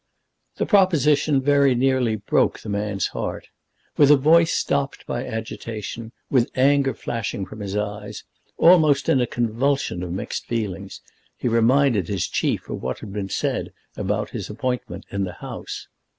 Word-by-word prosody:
The - - -1
proposition 150 - +3
very 140 -2 +4
nearly 125 -3 +2
broke 105 - +1
the 110 - -8
man's 100 -2 -1
heart. - - -5 0.5
With 145 -2 +6
a 150 - +8
voice 165 +4 +5
stopped 140 0 -1
by 120 +2 -3
agitation, 110 0 -6 0.2
with 125 -3 +2
anger 135 0 +3
flashing 105 -4 -3
from 110 +4 -11
his 100 -1 -4
eyes, 105 0 -4 0.3
almost 155 -5 +5
in 135 -6 +4
a 120 - +1
convulsion 120 -3 -1
of 90 -1 -4
mixed 95 - -4
feelings, 100 -4 -4 0.4
he - - -2
reminded 115 - +3
his 100 -2 -1
chief - - -1
of - - -5
what 65 0 -3
had 100 -3 -8
been 100 -2 -4
said - - -2 0.2
about 105 +2 -2
his 100 -6 -5
appointment 125 +4 -4
in 100 0 -1
the 90 -2 -4
House. - - -7
115 Hz, 155 wpm, -23 LUFS, 105-140 Hz, 0.5 s, a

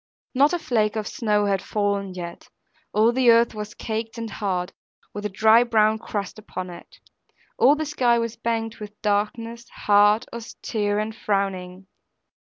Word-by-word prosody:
Not 280 +3 +4
a 350 - +1
flake 220 -9 0
of 215 -1 -2
snow 210 -3 0
had 195 -2 +1
fallen 200 -2 -1
yet; 170 -1 -8 0.4
all 220 +3 +4
the 250 0 +3
earth 230 0 +5
was 210 -1 -7
caked 225 +1 -4
and 230 -1 -5
hard, 190 -3 -2 0.4
with 205 0 -3
a - - -10
dry 220 +4 +5
brown 220 -2 +2
crust 205 -1 -5
upon 185 -3 -6
it; - - -13 0.6
all 280 +3 +6
the 310 +1 -3
sky 250 -5 +2
was 230 -1 -2
banked 225 -1 -3
with 210 0 -10
darkness, 225 +3 -1
hard, 205 +3 +3
austere, 215 -2 -3
and 215 +1 -2
frowning. 190 -3 -2
215 Hz, 160 wpm, -24 LUFS, 205-230 Hz, 0.6 s, all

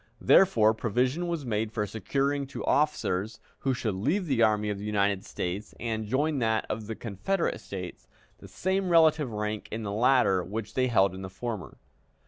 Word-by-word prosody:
Therefore, 110 - +5
provision 125 - 0
was 170 -5 -3
made 110 -2 -1
for 110 -2 -1
securing 135 +7 -1
to 140 - -6
officers, 115 -9 0 0.2
who 135 -2 0
should 110 -4 -2
leave 145 - 0
the 135 -7 +1
Army 105 -1 +3
of 100 - -4
the - - -7
United 100 -2 +1
States 95 +3 -5
and 110 -2 -3
join 145 +5 +1
that 110 -2 +1
of 110 -1 -4
the 110 - -4
Confederate 120 - -2
States, 90 -3 -8 0.3
the - - -12
same 190 0 -1
relative 160 -5 +4
rank 105 0 -3
in 110 +1 -4
the 100 - -3
latter 110 -4 +3
which 105 +3 -5
they 130 -1 +2
held 100 -6 +3
in 95 - -7
the 95 - -6
former. 100 -2 -6
110 Hz, 180 wpm, -28 LUFS, 105-140 Hz, 0.3 s, Therefore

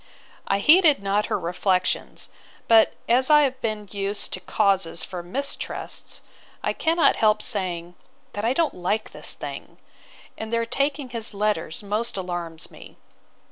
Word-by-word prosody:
I 195 - +2
heeded 300 - +5
not 200 +2 +1
her - - -1
reflections; 180 +1 -1 0.4
but 225 -1 +6
as 255 +3 +4
I 300 -1 +7
have 265 -2 0
been 215 -2 -3
used 200 0 -2
to - - -2
causes 190 -4 +1
for 180 -2 -5
mistrusts, 270 +12 -5 0.4
I - - 0
cannot 330 +1 +3
help 215 -1 +4
saying, 175 -6 0 0.4
that 205 - -4
I 235 +3 +2
don't 325 +2 +1
like 195 +5 -2
this - - -2
thing: - - -8 0.6
And 220 0 -5
their 230 0 +1
taking 275 +3 -1
his 230 -3 -4
letters 210 -4 -1
most 210 +2 -2
alarms 175 -3 -5
me. - - -14
210 Hz, 145 wpm, -24 LUFS, 185-250 Hz, 0.6 s, I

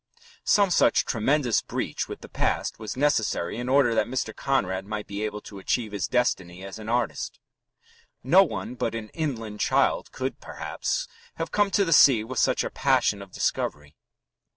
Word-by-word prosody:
Some 200 -3 +4
such - - +4
tremendous 125 +1 +1
breach - - -3
with - - -7
the - - -10
past - - -1
was 110 +3 -6
necessary 115 -9 +1
in 125 +1 -3
order 135 -3 +4
that 115 - +1
Mr. 130 +1 -3
Conrad 95 -9 0
might 105 0 -4
be 100 +1 -5
able 105 -1 -3
to 100 -1 -10
achieve 110 +2 -1
his 100 -3 -2
destiny 95 -7 -1
as 95 +2 -8
an 110 0 -7
artist. 120 -1 -1 0.8
No 170 +10 +6
one 110 - -2
but 115 -2 -2
an 110 -1 -5
inland 115 -10 -4
child - - +1
could, - - -4
perhaps, - - -3 0.3
have 165 0 -4
come 205 -1 +2
to 195 +1 +2
the 165 - +2
sea 130 -6 +7
with 125 +3 -4
such - - +2
a - - -4
passion 100 -1 +2
of 100 -1 -11
discovery. 75 -3 -2
115 Hz, 175 wpm, -26 LUFS, 105-135 Hz, 0.8 s, sea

